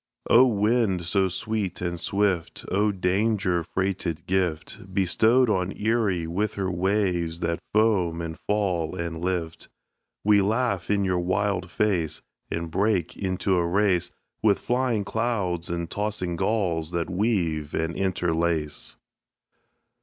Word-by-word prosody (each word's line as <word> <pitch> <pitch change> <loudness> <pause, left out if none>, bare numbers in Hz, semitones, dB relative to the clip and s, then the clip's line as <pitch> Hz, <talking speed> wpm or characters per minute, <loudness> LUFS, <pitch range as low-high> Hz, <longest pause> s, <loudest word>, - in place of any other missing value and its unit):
O! 125 +3 +8
wind 105 -4 +1
so 95 +3 +2
sweet 95 0 -3
and 85 -1 -3
swift, 95 -1 -1
O! 105 +2 +2
danger 95 -1 +1
freighted 90 -3 -2
gift 95 0 -2
Bestowed 110 +7 +3
on 95 -3 0
Erie 105 -6 +1
with 95 +6 -2
her 95 -2 -1
waves 90 -3 0
that 85 0 -1
foam 100 -6 +2
and 85 -1 -4
fall 90 -6 0
and 85 -2 -4
lift, 90 -3 -3 0.5
We 105 -1 +5
laugh 105 -2 0
in 100 -1 +2
your 90 -1 +1
wild 95 0 0
face, 85 -9 0 0.3
And 85 0 -3
break 100 -2 +1
into 95 0 0
a 85 -1 +1
race 95 -1 +2 0.3
With 105 -2 +4
flying 120 -4 0
clouds 100 -7 -1
and 85 0 -2
tossing 100 -3 -2
gulls 85 -5 0
that 85 -1 -2
weave 90 -6 0
and 80 +1 -1
interlace. 85 -4 -1
95 Hz, 130 wpm, -25 LUFS, 85-105 Hz, 0.5 s, O